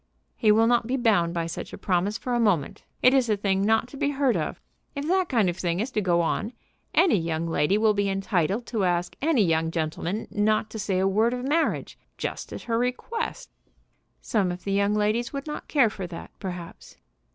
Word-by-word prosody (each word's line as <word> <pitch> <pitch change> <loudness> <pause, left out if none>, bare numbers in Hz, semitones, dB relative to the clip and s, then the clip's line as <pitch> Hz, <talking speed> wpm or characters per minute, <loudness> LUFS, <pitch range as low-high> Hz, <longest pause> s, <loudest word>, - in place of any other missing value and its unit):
"He 215 -3 +3
will 220 +2 +5
not 235 -1 +2
be 260 +2 0
bound 210 -9 +2
by 170 -1 -2
such 165 - -6
a - - -6
promise 195 +3 0
for 250 - -4
a 240 - +2
moment. 190 -11 0 0.2
It 255 - +7
is 260 -4 +3
a 210 - +2
thing 195 -1 0
not 225 +3 +2
to 275 - -10
be 285 - +1
heard 275 -4 +1
of. 155 -3 -2 0.4
If 285 +1 -3
that 370 0 +2
kind 225 -7 +2
of 175 0 -1
thing 175 -1 -1
is 235 +5 -2
to 215 - 0
go 175 -3 +2
on, 210 +7 -1 0.4
any 370 - +4
young 165 0 -2
lady 165 +4 +2
will 215 0 +3
be 200 -1 0
entitled 195 +2 0
to 220 -4 -2
ask 175 -1 0
any 290 -7 +3
young 160 -2 +1
gentleman 165 +5 -3
not 215 +1 +1
to 220 - -6
say 195 -2 -1
a 190 +1 +2
word 220 +5 +2
of 250 +1 -5
marriage, 320 +3 0 0.2
just - - -5
at - - -7
her 230 -1 0
request." 455 - -3 0.7
"Some 200 -7 0
of 175 +1 -7
the 200 - -3
young 200 +1 +2
ladies 215 +4 0
would 275 0 -4
not 300 -1 -6
care 260 -8 +3
for 190 -4 -6
that, 170 -1 -9
perhaps." 180 -4 -8
210 Hz, 220 wpm, -26 LUFS, 180-245 Hz, 0.7 s, It